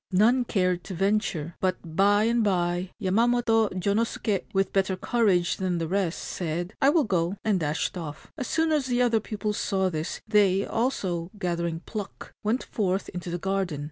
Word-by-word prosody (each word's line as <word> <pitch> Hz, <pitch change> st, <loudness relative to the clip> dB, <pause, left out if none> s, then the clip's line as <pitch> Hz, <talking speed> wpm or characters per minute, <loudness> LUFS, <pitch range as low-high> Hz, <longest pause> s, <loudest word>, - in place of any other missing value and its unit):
None 235 Hz, +7 st, +4 dB
cared 180 Hz, -5 st, 0 dB
to 190 Hz, -, -6 dB
venture; 195 Hz, -4 st, 0 dB
but 185 Hz, -3 st, -2 dB
by 205 Hz, +2 st, +4 dB
and 230 Hz, +1 st, +2 dB
by 175 Hz, -2 st, 0 dB
Yamamoto 225 Hz, +2 st, +2 dB
Jonosuke, 205 Hz, +1 st, 0 dB
with 195 Hz, -2 st, 0 dB
better 190 Hz, -1 st, +2 dB
courage 190 Hz, -6 st, +2 dB
than 185 Hz, -2 st, -1 dB
the 165 Hz, -1 st, -2 dB
rest, 185 Hz, -1 st, 0 dB
said, 175 Hz, +2 st, -3 dB
' -, -, -48 dB
I 275 Hz, -, +6 dB
will 310 Hz, +1 st, +4 dB
go/ 185 Hz, -2 st, 0 dB
and 210 Hz, -4 st, +2 dB
dashed 155 Hz, +2 st, -1 dB
off. 155 Hz, -4 st, -7 dB
As 260 Hz, -5 st, -4 dB
soon 320 Hz, 0 st, +1 dB
as 295 Hz, -4 st, +1 dB
the 245 Hz, -1 st, +1 dB
other 235 Hz, -2 st, +3 dB
pupils 210 Hz, 0 st, -3 dB
saw 190 Hz, -1 st, 0 dB
this, 155 Hz, +1 st, -3 dB
they 200 Hz, -3 st, +3 dB
also, 190 Hz, -8 st, -1 dB
gathering 170 Hz, -3 st, -2 dB
pluck, 210 Hz, -1 st, -7 dB
went 225 Hz, +5 st, 0 dB
forth 190 Hz, -2 st, -1 dB
into 180 Hz, 0 st, -6 dB
the 175 Hz, -, -2 dB
garden. 190 Hz, -4 st, -1 dB
195 Hz, 175 wpm, -26 LUFS, 175-220 Hz, -, I